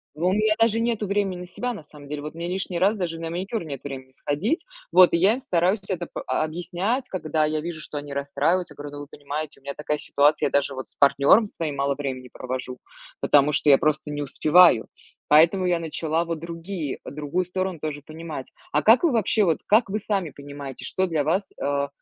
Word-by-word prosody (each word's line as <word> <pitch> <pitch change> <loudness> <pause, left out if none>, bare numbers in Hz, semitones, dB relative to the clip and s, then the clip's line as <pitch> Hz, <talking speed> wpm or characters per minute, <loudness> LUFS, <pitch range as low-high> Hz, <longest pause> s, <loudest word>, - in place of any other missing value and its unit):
У 175 +4 +1
меня 215 +1 +2
даже 225 0 +3
нету 230 -2 0
времени 195 -3 -1
на - - -7
себя, 245 +7 -4
на 185 - -9
самом 145 -1 -14
деле. 145 0 -5
Вот 150 - -6
мне 170 +1 -5
лишний 180 -1 -3
раз 200 +4 +3
даже 165 -3 -3
на 165 0 -4
маникюр 190 +4 -3
нет 140 -4 -7
времени 130 -2 -7
сходить. 195 - -2 0.3
Вот, 185 -2 +7
и - - +4
я 195 +6 +4
им 255 - -3
стараюсь 185 -2 +1
это 180 -3 -3
по - - -5
объяснять, 180 +10 -2
когда 155 -4 0
я 155 0 -1
вижу, 165 -1 -5
что 150 -1 -7
они 145 0 -6
расстраиваются. 140 +6 0
Я - - -23
говорю: 145 0 -7
"Ну, - - -7
вы 145 - -9
понимаете, 145 +1 -6
у - - -32
меня 140 0 -4
такая 150 0 -2
ситуация, 145 +2 +2
я - - -5
даже 140 -1 +1
вот 130 0 -7
с - - -17
партнёром 140 +9 +5
своим 160 -7 -4
мало 140 0 0
времени 130 -3 -5
провожу, 130 0 -6 0.4
потому 145 +1 +4
что 145 +1 +2
я 135 - +8
просто 155 0 0
не 145 0 -3
успеваю". 155 -1 +5 0.4
Поэтому 170 +5 +5
я 175 -1 +2
начала, 165 0 -1
вот, 165 -2 -3
другие 165 -2 -5
другую 150 +5 -2
сторону 185 -2 -3
тоже 145 -1 -4
понимать. 155 -3 -8 0.2
А 150 - +2
как 225 +8 +6
вы 335 - +4
вообще, 220 -1 +2
вот, 165 -4 +2
как 215 0 +4
вы 215 +2 -1
сами 195 -7 -2
понимаете, 140 -1 -8
что 190 - 0
для 160 -4 0
вас, 185 +6 0
э, 140 0 0
165 Hz, 220 wpm, -24 LUFS, 145-185 Hz, 0.4 s, я